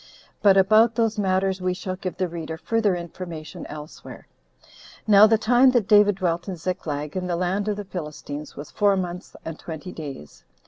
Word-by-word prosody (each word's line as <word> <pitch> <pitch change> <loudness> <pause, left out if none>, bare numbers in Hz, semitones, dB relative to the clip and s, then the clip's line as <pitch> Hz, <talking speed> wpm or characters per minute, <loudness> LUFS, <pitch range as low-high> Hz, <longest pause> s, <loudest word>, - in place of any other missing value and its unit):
But 200 -2 +5
about 215 +4 +5
those 225 -2 0
matters 190 -1 0
we 180 0 0
shall 185 0 -4
give 185 -1 -6
the 185 - 0
reader 165 -1 -6
further 215 +1 +1
information 170 -2 -7
elsewhere. 150 0 -10 0.8
Now 210 0 +7
the 220 0 +4
time 245 +4 +4
that 235 -6 +2
David 205 -1 +5
dwelt 175 -2 -2
in 185 - -3
Ziklag, 155 -4 -4
in 185 -1 -2
the 175 - -1
land 185 +4 -1
of 210 - 0
the 205 - -6
Philistines, 150 -4 -7
was 145 +1 -9
four 200 -1 +2
months 180 -1 -5
and 160 -1 -6
twenty 165 +2 -7
days. 140 - -9
185 Hz, 180 wpm, -24 LUFS, 165-205 Hz, 0.8 s, Now